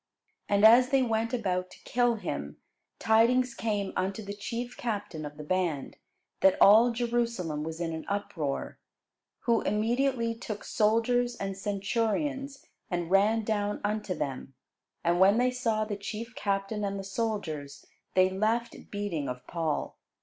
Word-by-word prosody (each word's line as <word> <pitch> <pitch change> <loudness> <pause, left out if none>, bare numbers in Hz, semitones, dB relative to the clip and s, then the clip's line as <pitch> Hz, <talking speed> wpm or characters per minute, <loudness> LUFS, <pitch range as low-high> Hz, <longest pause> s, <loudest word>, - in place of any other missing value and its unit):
And 205 +1 +4
as 245 +3 +8
they 270 -1 +3
went 230 -1 0
about 185 -6 -1
to - - -17
kill 245 -1 +2
him, 70 - -5 0.4
tidings 235 +3 +3
came 205 -4 -2
unto 195 +3 -2
the 200 0 -5
chief 235 +4 -5
captain 200 -9 -4
of 145 0 -12
the 150 - -7
band, 165 -4 -1 0.4
that 190 - +5
all 220 +4 +8
Jerusalem 235 -9 -1
was 160 +1 -5
in 165 -1 -2
an 160 - -6
uproar. 165 -8 -3 0.6
Who 235 -3 +2
immediately 230 +2 +1
took 225 -2 -6
soldiers 240 +3 +2
and 195 -3 -4
centurions, 230 +8 -2 0.2
and 175 -1 -2
ran 210 +3 +4
down 205 -1 -1
unto 210 -2 -1
them: 135 -1 -5 0.5
and 175 +1 +2
when 195 +3 +6
they 250 +1 +3
saw 225 -4 0
the 210 -1 -4
chief 225 +4 -6
captain 200 0 -2
and 200 0 -2
the 195 - -5
soldiers, 190 -9 -4 0.3
they 185 0 +6
left 220 +5 -1
beating 190 -9 -3
of 125 0 -6
Paul. 165 -3 -3
205 Hz, 150 wpm, -29 LUFS, 185-230 Hz, 0.6 s, as